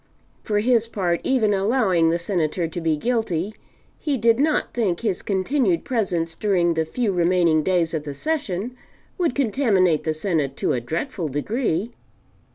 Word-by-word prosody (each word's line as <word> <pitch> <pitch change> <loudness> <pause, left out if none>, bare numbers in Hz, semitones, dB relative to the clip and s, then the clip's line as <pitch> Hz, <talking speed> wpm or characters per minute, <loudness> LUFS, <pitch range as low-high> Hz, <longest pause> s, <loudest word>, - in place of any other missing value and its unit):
For 210 -1 0
his 230 0 +2
part, 180 -6 -1
even 230 -6 +2
allowing 195 -5 +2
the 170 - +1
Senator 170 -2 -1
to 170 +2 -6
be 160 -2 +1
guilty, 215 -2 -1 0.5
he 290 -3 -1
did 230 +1 +3
not 300 +1 +1
think 205 -8 0
his 210 -6 -1
continued 195 - 0
presence 180 -9 -1
during 175 -2 +1
the 160 -1 0
few 220 +6 -1
remaining 175 -3 +3
days 175 -1 +1
of 155 -2 -2
the 145 -2 -6
Session 245 - -2 0.4
would 335 -8 +1
contaminate 210 - +2
the 155 -1 -1
Senate 155 -6 -1
to - - 0
a 125 - -1
dreadful 165 - -3
degree. 200 - -1
185 Hz, 160 wpm, -23 LUFS, 165-230 Hz, 0.5 s, did